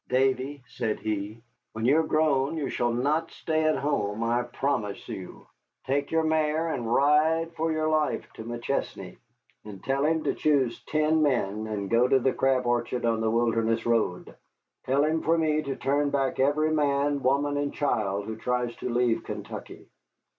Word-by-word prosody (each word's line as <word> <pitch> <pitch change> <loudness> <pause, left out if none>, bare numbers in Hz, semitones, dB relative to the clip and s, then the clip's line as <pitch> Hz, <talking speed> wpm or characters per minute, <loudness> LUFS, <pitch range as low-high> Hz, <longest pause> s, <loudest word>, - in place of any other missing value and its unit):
"Davy," 130 +1 0
said 110 -3 -2
he, 110 +1 -4 0.3
"when 110 +1 -3
you 140 +5 +5
are 160 - 0
grown 155 -1 +1
you 145 -3 -2
shall 120 0 0
not 145 +7 0
stay 155 -1 -1
at 155 -2 +2
home, 115 -7 -1
I 120 +1 +1
promise 120 -4 -3
you. 95 -2 -8 0.4
Take 140 +2 0
your 160 0 +1
mare 155 +1 +1
and 120 -7 -3
ride 155 +5 +3
as - - -25
for 165 0 -1
your 155 0 0
life 155 -1 0
to - - -8
McChesney, 120 +4 -4 0.5
and 100 -3 -10
tell 135 +1 0
him 160 +1 +1
to - - 0
choose 135 -6 +1
ten 155 +1 +2
men 110 -7 0
and 105 -2 -3
go 115 +4 +3
to 135 +1 +4
the 130 0 +1
Crab 130 -1 +1
Orchard 120 0 0
on 115 -1 +1
the 110 - +1
Wilderness 115 0 +1
Road. 115 -6 0 0.5
Tell 135 +2 +3
him 160 +1 +1
for 165 +1 +2
me 155 -1 +1
to 140 -3 -4
turn 145 +1 0
back 135 -2 -1
every 150 +3 +2
man, 145 -1 +1
woman, 140 +2 +1
and 145 0 -1
child 105 -8 -1
who 110 0 -5
tries 125 0 -1
to - - -4
leave 120 -1 +1
Kentucky." - - -8
135 Hz, 180 wpm, -27 LUFS, 115-150 Hz, 0.5 s, you